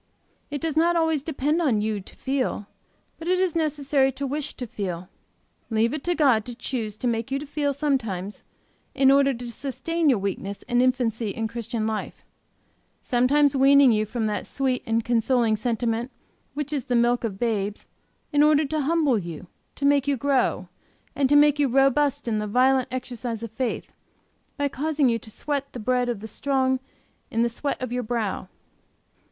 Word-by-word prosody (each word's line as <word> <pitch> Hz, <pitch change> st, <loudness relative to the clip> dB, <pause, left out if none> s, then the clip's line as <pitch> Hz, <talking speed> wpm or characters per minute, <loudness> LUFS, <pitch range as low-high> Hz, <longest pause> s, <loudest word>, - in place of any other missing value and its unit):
It 290 Hz, -1 st, -4 dB
does 320 Hz, -2 st, -2 dB
not 340 Hz, +2 st, +3 dB
always 320 Hz, -3 st, +2 dB
depend 300 Hz, +2 st, -1 dB
on 255 Hz, -10 st, +2 dB
you 210 Hz, -1 st, -1 dB
to -, -, -13 dB
feel; 265 Hz, -6 st, -2 dB, 0.5 s
but 325 Hz, -, -7 dB
it 365 Hz, +1 st, +3 dB
is 370 Hz, -3 st, 0 dB
necessary 285 Hz, -4 st, +1 dB
to 280 Hz, -, -4 dB
wish 290 Hz, +2 st, -3 dB
to 250 Hz, -, -5 dB
feel. 185 Hz, -5 st, -5 dB, 0.6 s
Leave 225 Hz, +2 st, +1 dB
it 305 Hz, -, -4 dB
to 350 Hz, 0 st, +1 dB
God 265 Hz, -9 st, +4 dB
to 245 Hz, -, -7 dB
choose 225 Hz, -4 st, -4 dB
to 250 Hz, -, -2 dB
make 230 Hz, +1 st, -1 dB
you 275 Hz, +1 st, -1 dB
feel 290 Hz, 0 st, -1 dB
sometimes, 230 Hz, -10 st, -2 dB, 0.5 s
in 270 Hz, 0 st, +5 dB
order 275 Hz, 0 st, +5 dB
to 240 Hz, 0 st, -7 dB
sustain 315 Hz, +6 st, -1 dB
your 255 Hz, -, +4 dB
weakness 195 Hz, 0 st, -4 dB
and 245 Hz, 0 st, +2 dB
infancy 245 Hz, -4 st, +1 dB
in 225 Hz, +3 st, -2 dB
Christian 230 Hz, 0 st, -3 dB
life; 220 Hz, -1 st, -4 dB, 0.8 s
sometimes 275 Hz, +3 st, +3 dB
weaning 275 Hz, -1 st, +6 dB
you 215 Hz, -1 st, +1 dB
from 225 Hz, +1 st, -2 dB
that 210 Hz, -1 st, -2 dB
sweet 260 Hz, -2 st, -1 dB
and 225 Hz, 0 st, 0 dB
consoling 235 Hz, -1 st, +2 dB
sentiment 230 Hz, +1 st, -1 dB, 0.5 s
which 295 Hz, 0 st, -3 dB
is 275 Hz, -4 st, -2 dB
the 250 Hz, -3 st, 0 dB
milk 240 Hz, +1 st, +2 dB
of 210 Hz, -4 st, -3 dB
babes, 210 Hz, -3 st, -2 dB, 0.5 s
in 290 Hz, -, +4 dB
order 300 Hz, 0 st, +5 dB
to 310 Hz, +2 st, -1 dB
humble 295 Hz, -5 st, +2 dB
you, 170 Hz, -2 st, -7 dB, 0.3 s
to 280 Hz, -, -3 dB
make 285 Hz, -1 st, +3 dB
you 280 Hz, -1 st, +1 dB
grow, 275 Hz, 0 st, +1 dB, 0.5 s
and 275 Hz, -2 st, +2 dB
to 290 Hz, -, +4 dB
make 295 Hz, 0 st, +5 dB
you 285 Hz, -, +4 dB
robust 275 Hz, +1 st, +2 dB
in 215 Hz, -2 st, 0 dB
the 210 Hz, -, -3 dB
violent 255 Hz, +4 st, +3 dB
exercise 245 Hz, -3 st, -4 dB
of 230 Hz, -, -6 dB
faith, 255 Hz, -3 st, -3 dB, 0.7 s
by 285 Hz, -1 st, +1 dB
causing 290 Hz, 0 st, +1 dB
you 230 Hz, -1 st, +1 dB
to 220 Hz, -, -12 dB
sweat 280 Hz, +4 st, -3 dB
the 245 Hz, -, -6 dB
bread 250 Hz, +2 st, +1 dB
of 230 Hz, -4 st, -3 dB
the 220 Hz, -, -6 dB
strong 260 Hz, +1 st, 0 dB, 0.5 s
in 230 Hz, +1 st, +1 dB
the -, -, +3 dB
sweat 275 Hz, +5 st, -3 dB
of 255 Hz, -2 st, -4 dB
your 250 Hz, 0 st, -1 dB
brow. 220 Hz, -5 st, -2 dB
255 Hz, 185 wpm, -25 LUFS, 225-285 Hz, 0.8 s, weaning